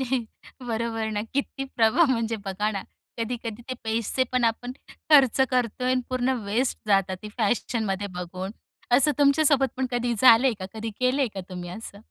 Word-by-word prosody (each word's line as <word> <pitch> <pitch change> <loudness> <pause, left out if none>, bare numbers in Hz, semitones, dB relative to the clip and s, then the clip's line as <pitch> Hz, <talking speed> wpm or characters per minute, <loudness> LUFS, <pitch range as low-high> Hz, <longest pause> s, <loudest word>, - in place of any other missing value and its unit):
हं. 260 -2 -1 0.4
बरोबर 225 -1 -2
ना 210 -1 -2
किती 275 0 -2
प्रभाव 245 +7 +4
म्हणजे 230 -2 0
बघा 200 +2 -1
ना 200 -2 -4 0.4
कधी-कधी 230 -1 -4
ते - - -2
पैसे 225 +3 0
पण 250 -1 +2
आपण 235 +2 -1 0.4
खर्च 275 -4 +6
करतोय 250 0 0
आणि 255 0 +2
पूर्ण 255 0 +1
वेस्ट 230 +6 0
जातात 195 -2 +2
ते 210 - -6
फॅशनमध्ये 210 -2 0
बघून. 185 +2 -5 0.4
असं 250 +4 +5
तुमच्या 285 +2 +4
सोबत 275 -2 +4
पण 260 0 0
कधी 240 -1 0
झालंय 255 +1 +7
का? 185 - -4
कधी 225 +1 -4
केलंय 255 +2 +2
का 195 - -4
तुम्ही 180 -2 -7
असं? 200 +1 -9
230 Hz, 170 wpm, -25 LUFS, 210-255 Hz, 0.4 s, झालंय